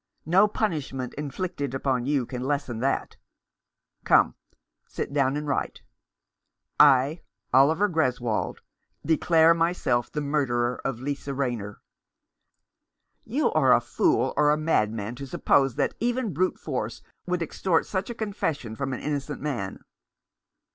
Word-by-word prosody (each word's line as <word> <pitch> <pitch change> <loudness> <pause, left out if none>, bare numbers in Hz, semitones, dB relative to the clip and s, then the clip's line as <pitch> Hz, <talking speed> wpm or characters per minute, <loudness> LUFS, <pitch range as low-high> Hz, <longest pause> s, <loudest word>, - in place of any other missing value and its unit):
No 185 +6 +5
punishment 150 - -3
inflicted 145 -1 -4
upon 130 -2 -1
you 140 -4 +1
can 125 +1 -6
lessen 135 -4 -2
that. 135 +3 -1 0.9
Come, - - +4 0.5
sit - - -5
down 140 -1 +2
and 150 0 -4
write: 140 - -2 0.5
' - - -54 0.2
I, 145 +6 -4 0.3
Oliver 155 +10 +5
Greswold, 125 - -1 0.4
declare 165 0 +4
myself 165 -8 0
the 150 - -2
murderer 125 -5 0
of 135 -4 -3
Lisa 140 +1 -4
Rayner.' 120 -7 -3 0.7
" - - -51
"You - - 0
are - - +4
a - - +3
fool - - +1
or 150 - +4
a 150 - +3
madman 110 -8 0
to 140 - -7
suppose 135 -1 +2
that - - 0
even 240 -3 -1
brute 185 +5 0
force - - -4 0.2
would 180 -1 0
extort 165 +1 0
such 190 +2 -3
a 240 - -5
confession 165 - -3
from 135 +2 -3
an - - -5
innocent 145 -1 -3
man." 120 -10 -4
140 Hz, 135 wpm, -26 LUFS, 125-165 Hz, 0.9 s, No